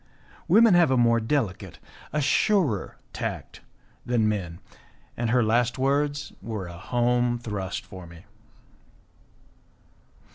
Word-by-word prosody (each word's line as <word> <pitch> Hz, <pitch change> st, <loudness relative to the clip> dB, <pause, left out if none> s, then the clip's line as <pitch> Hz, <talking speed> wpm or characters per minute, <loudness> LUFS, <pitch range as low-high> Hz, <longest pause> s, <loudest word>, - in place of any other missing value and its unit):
Women 220 Hz, +3 st, +6 dB
have 175 Hz, -3 st, +5 dB
a 130 Hz, -, +2 dB
more 115 Hz, -1 st, +4 dB
delicate, 110 Hz, -, -2 dB, 0.3 s
a 150 Hz, -, -1 dB
surer 145 Hz, -, +1 dB, 0.2 s
tact -, -, -6 dB, 0.4 s
than 120 Hz, -3 st, +1 dB
men, 95 Hz, -6 st, -3 dB, 0.6 s
and 120 Hz, -1 st, -2 dB
her 125 Hz, 0 st, +3 dB
last 120 Hz, +3 st, +1 dB
words 145 Hz, +2 st, -1 dB
were 110 Hz, -4 st, -5 dB
a 85 Hz, -, -9 dB
home 120 Hz, +5 st, 0 dB
thrust 105 Hz, -5 st, -5 dB
for 95 Hz, -2 st, -11 dB
me. 85 Hz, 0 st, -14 dB
120 Hz, 115 wpm, -25 LUFS, 105-135 Hz, 0.6 s, Women